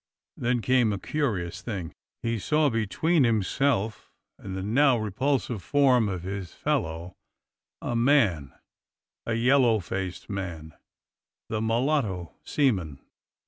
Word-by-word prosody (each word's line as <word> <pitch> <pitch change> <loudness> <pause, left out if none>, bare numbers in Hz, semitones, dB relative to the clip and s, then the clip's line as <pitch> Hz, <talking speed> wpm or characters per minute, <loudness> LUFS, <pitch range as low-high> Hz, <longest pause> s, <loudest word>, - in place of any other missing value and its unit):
Then 120 -1 0
came 125 -4 +3
a 100 - -1
curious 100 - -2
thing: 95 -8 -5 0.3
He 115 -1 -1
saw 150 +6 +2
between 135 - +1
himself 110 0 0 0.3
and 95 -1 -6
the 95 - -4
now 130 +5 +4
repulsive 115 +1 -1
form 130 -1 +3
of 90 -3 -4
his 95 -2 -5
fellow 80 +2 -2 0.7
a 120 - -2
man 115 - +3 0.4
— - - -66
a 115 - 0
yellow 120 -1 +4
faced 95 0 -5
man 85 -6 -5 0.4
— - - -66
the 110 -1 -1
mulatto 110 - 0
seaman. 95 - 0
110 Hz, 125 wpm, -27 LUFS, 95-130 Hz, 0.7 s, now